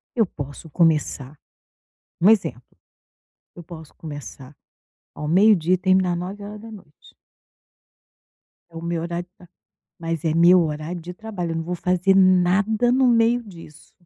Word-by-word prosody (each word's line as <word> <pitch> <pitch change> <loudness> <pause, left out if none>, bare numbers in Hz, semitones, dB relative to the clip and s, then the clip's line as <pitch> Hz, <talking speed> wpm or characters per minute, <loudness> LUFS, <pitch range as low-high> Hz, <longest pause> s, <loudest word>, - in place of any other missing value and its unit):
Eu 225 -3 +3
posso 145 -1 -9
começar 150 -4 0 0.9
um 190 - +6
exemplo, 165 - 0 0.8
eu 175 - -9
posso 160 -2 -12
começar 145 -3 -10 0.6
ao 150 - -6
meio-dia 185 -1 +4
e - - 0
terminar 185 -1 +2
21h". 205 -1 -10 1.6
É - - -18
o - - -7
meu 170 -1 -2
horário 170 +1 -5
de 185 - -59
tra 175 - -18 0.5
mas 165 -2 -4
é 160 - +1
meu 175 +2 +6
horário 155 +2 -4
de 175 +2 -8
trabalho. 185 -3 -6
Eu - - -3
não 165 - -2
vou 175 +2 -4
fazer 180 +2 +1
nada 190 +5 +3
no 260 +1 +3
meio 235 0 +3
disso. 165 -8 -15
175 Hz, 140 wpm, -22 LUFS, 165-195 Hz, 1.6 s, um